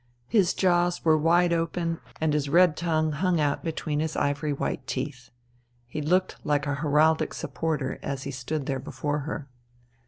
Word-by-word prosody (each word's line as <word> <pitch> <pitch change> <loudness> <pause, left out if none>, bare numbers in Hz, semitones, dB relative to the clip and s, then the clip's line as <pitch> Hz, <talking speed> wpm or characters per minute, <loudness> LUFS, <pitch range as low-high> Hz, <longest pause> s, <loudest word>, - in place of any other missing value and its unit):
His 195 -6 +3
jaws 175 -2 +2
were 160 -1 +6
wide 170 +3 +3
open, 165 0 -1 0.2
and 155 -1 +1
his 145 -2 0
red 175 0 +5
tongue 155 -2 0
hung 175 +3 +1
out 145 -1 0
between 155 -2 -2
his 160 0 -2
ivory 145 +1 0
white 140 -2 -3
teeth. 130 -1 -4 0.6
He 150 +6 -5
looked 180 +5 +1
like 145 -1 +1
a 145 - -1
heraldic 150 +2 +2
supporter 150 -5 -2
as 135 -1 -4
he 140 - -4
stood 135 +3 -3
there 135 -1 -2
before 145 +3 -3
her. 150 0 -5
155 Hz, 165 wpm, -26 LUFS, 145-165 Hz, 0.6 s, were